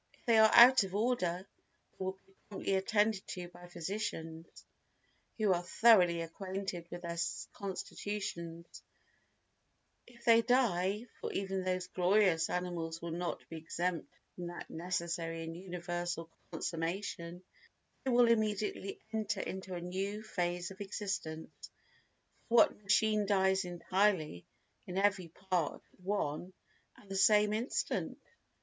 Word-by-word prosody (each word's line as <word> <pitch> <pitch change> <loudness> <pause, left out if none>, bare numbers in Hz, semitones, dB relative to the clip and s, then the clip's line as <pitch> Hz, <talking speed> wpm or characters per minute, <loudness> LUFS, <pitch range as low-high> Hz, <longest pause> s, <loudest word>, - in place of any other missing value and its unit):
If - - -30
they 230 -3 +5
are 220 0 +8
out 250 +1 +10
of 190 0 -5
order 200 -5 0 0.4
they - - -7
will 190 0 -1
be 195 - -26 0.2
promptly 195 -1 -2
attended 205 +1 +1
to 180 -1 -6
by 175 0 -13
physicians 170 -2 -4 0.9
who 210 -4 +3
are 175 - 0
thoroughly 180 -3 +5
acquainted 185 +1 -5
with 175 0 -7
their 170 0 -4 0.3
constitutions; 190 -3 -5 1.3
if 235 -1 -17
they 230 -1 +7
die, 215 -4 +2
for - - -4
even 195 -1 -2
these 185 0 -1
glorious 180 -2 +3
animals 170 -2 -3
will 170 0 -5
not 175 +1 -4
be 165 - -7
exempt 170 +1 -3 0.2
from 175 -1 -6
that 175 - -8
necessary 170 -1 -3
and 165 0 -6
universal 175 -2 -4 0.2
consummation, 170 +1 -4 0.6
they 265 - -1
will 245 -1 +5
immediately 215 -3 0
enter 215 -2 -1
into 190 -1 -5
a 175 - -4
new 195 +4 -3
phase 175 -3 -2
of 195 - -10
existence, 195 -6 -4 1.0
for 235 - 0
what 230 - +5
machine 210 +1 +3
dies 190 -1 +3
entirely 175 - 0 0.4
in 180 - -4
every 195 -3 +2
part 180 -2 -2
at - - -27
one 180 -2 -2 0.4
and 205 - -18
the 195 - -5
same 210 +2 +5
instant? 230 +5 -1
185 Hz, 130 wpm, -33 LUFS, 175-205 Hz, 1.3 s, out